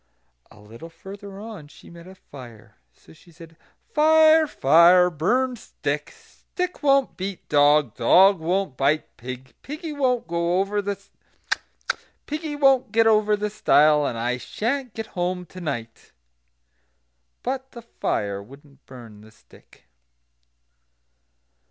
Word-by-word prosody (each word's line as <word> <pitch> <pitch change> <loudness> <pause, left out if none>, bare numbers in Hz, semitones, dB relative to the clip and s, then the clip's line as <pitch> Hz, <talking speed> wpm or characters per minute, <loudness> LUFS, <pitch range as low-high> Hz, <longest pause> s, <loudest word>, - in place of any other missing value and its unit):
A - - -18
little 115 +10 -12
further 195 +3 -11
on 210 -8 -9
she 145 - -17
met 170 +1 -13
a 190 - -13
fire. 120 - -14 0.2
So 80 - -20
she 170 - -21
said: 165 0 -15 0.4
"Fire! 315 +1 +5
fire! 175 - +5
burn 245 - 0
stick! - - -4
stick 360 0 -7
won't 275 -2 +2
beat 190 0 -6
dog; 145 0 +4
dog 195 0 +5
won't 175 -2 -1
bite 140 +4 0
pig; 130 +1 -9
piggy 305 +2 -7
won't 255 - 0
get 170 - -9
over 185 +4 0
the 200 0 -3 2.6
stile; 150 -7 +3
and 115 - -4
I 120 +2 -1
sha'n't 235 - -4
get 225 - -4
home 180 -1 -3
to 185 +2 -12
night." 120 -8 -6 1.3
But 265 +1 -4
the 235 - -10
fire 100 - -3
wouldn't 140 +5 -17
burn 115 -5 -13
the 110 - -16
stick. 110 - -22
175 Hz, 120 wpm, -23 LUFS, 140-220 Hz, 2.6 s, Fire